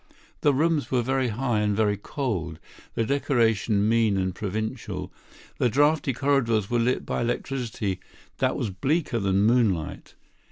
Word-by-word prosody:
The 145 - +4
rooms 155 +2 +1
were 125 -2 +1
very 130 +1 +1
high 120 0 0
and 105 -1 0
very 105 -2 +2
cold; 100 - -3 0.4
the 115 - +1
decoration 115 -6 +1
mean 110 -3 +3
and 95 -1 -1
provincial; 110 +3 -4 0.5
the 125 - +3
draughty 145 +3 +2
corridors 120 -6 +1
were 120 - +2
lit 125 +2 0
by - - -2
electricity 120 -5 -2 0.4
that - - +1
was 105 - -2
bleaker 130 - 0
than 100 -1 +2
moonlight. 105 -8 +1
115 Hz, 145 wpm, -25 LUFS, 105-135 Hz, 0.5 s, The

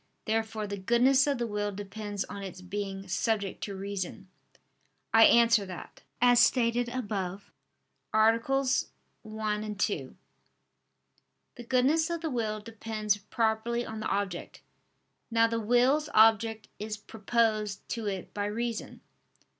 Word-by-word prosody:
Therefore 220 -1 -1
the 200 -1 -5
goodness 250 +7 +4
of 280 -2 +1
the 240 - -1
will 205 -2 -2
depends 205 0 -5
on 200 - -8
its 185 -2 -7
being 195 +1 -5
subject 200 +1 -1
to 200 - -6
reason. 195 0 -5 0.8
I 225 0 +8
answer 230 -2 +5
that, 180 -2 -9 0.2
As 245 0 +5
stated 240 0 +3
above 200 -6 -4 0.6
(AA. 220 +1 +4 0.8
1, 215 -1 -3
2), 155 -9 -2 1.4
the 240 - -10
goodness 265 +7 +2
of 335 -1 -3
the 320 -2 -2
will 220 -3 -1
depends 215 -1 -2
properly 225 +3 -1
on 220 0 -6
the 215 - -3
object. 195 -3 -3 0.7
Now 230 -1 +4
the 230 0 -1
will's 250 +7 +3
object 220 0 +4
is 215 +1 -4
proposed 215 -1 -1
to 230 -3 -3
it 195 -2 -4
by 205 -1 -2
reason. 230 +2 -4
220 Hz, 130 wpm, -29 LUFS, 205-235 Hz, 1.4 s, I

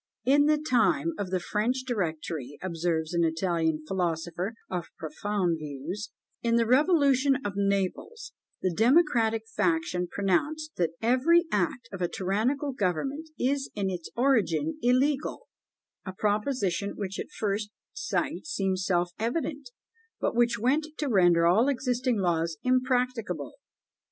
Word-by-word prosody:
"In 285 +2 +5
the 305 0 +4
time 290 +3 +2
of 200 - -2
the 185 0 0
French 230 +8 -1
Directory," 160 - -3
observes 165 -2 -2
an 170 0 +2
Italian 160 -2 0
philosopher 175 +3 -2
of 180 -2 -4
profound 175 +2 -1
views, 155 +8 -6 0.3
"in 230 -1 +1
the 235 0 +3
revolution 275 0 +4
of 205 - -2
Naples, 200 - -2 0.3
the 185 -2 +1
democratic 230 - +3
faction 170 +1 0
pronounced 295 - -1
that 165 -2 0
'Every 285 +9 +4
act 265 -7 0
of 195 - -7
a 175 - +2
tyrannical 230 - -1
government 270 - -2
is 270 +2 0
in 195 -2 -1
its 175 -2 -6
origin 270 - +1
illegal;' 270 - +1 0.6
a 190 - -6
proposition 205 -1 0
which 195 -1 -4
at - - -5
first 205 0 -1 0.2
sight - - -2
seems 190 - -1
self 175 -2 +1
evident, 275 +3 -2 0.5
but - - -1
which 240 0 +3
went 275 +8 +1
to 295 - -1
render 175 -6 +4
all 205 +9 +4
existing 250 -2 0
laws 170 -3 0
impracticable." 250 - 0
210 Hz, 130 wpm, -28 LUFS, 175-260 Hz, 0.6 s, In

